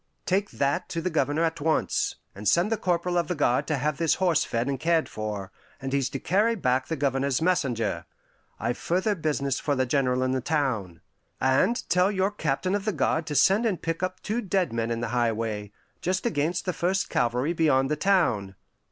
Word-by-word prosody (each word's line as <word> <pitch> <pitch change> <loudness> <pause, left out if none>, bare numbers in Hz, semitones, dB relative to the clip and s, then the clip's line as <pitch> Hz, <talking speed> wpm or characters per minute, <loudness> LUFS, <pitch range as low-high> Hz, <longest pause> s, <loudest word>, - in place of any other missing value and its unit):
"Take 195 +2 +1
that 140 0 -1
to 165 - -2
the 180 +2 -2
Governor 150 +1 +1
at 160 -1 -1
once, 160 +1 +1 0.2
and 100 +1 -6
send 175 - +3
the - - +3
corporal 175 -2 0
of 170 - -1
the 180 - -1
guard 125 -4 +1
to 150 - 0
have 145 +2 -1
this 165 -2 +2
horse 175 -5 +2
fed 115 +2 -2
and 135 -2 -2
cared 165 +1 +2
for, 105 -2 -5 0.3
and 135 -1 -5
he's 135 -2 +1
to 135 - -4
carry 210 - +2
back 130 - 0
the 165 - -2
Governor's 135 -2 0
messenger. 140 -10 0 0.5
I've 120 +2 -2
further 185 +5 +1
business 145 -6 -1
for 145 - 0
the 130 -1 +1
General 130 -1 +1
in 130 - 0
the 130 0 0
town. 120 - -1 0.4
And 130 - +2
tell 180 +3 +3
your 190 0 +1
captain 185 -1 -1
of 205 0 -1
the 215 - 0
guard 160 0 0
to 150 - -3
send 195 +9 +4
and 195 -6 -1
pick 165 +1 -3
up 185 0 -3
two 220 +3 -1
dead 185 - 0
men 115 0 -1
in 115 0 -2
the 115 - -2
highway, 115 -3 -1 0.3
just 185 +4 -1
against 170 -6 0
the 180 - -1
first 185 +3 0
Calvary 125 +6 0
beyond 145 -5 +2
the - - +2
town." 145 - +1
150 Hz, 205 wpm, -26 LUFS, 130-180 Hz, 0.5 s, send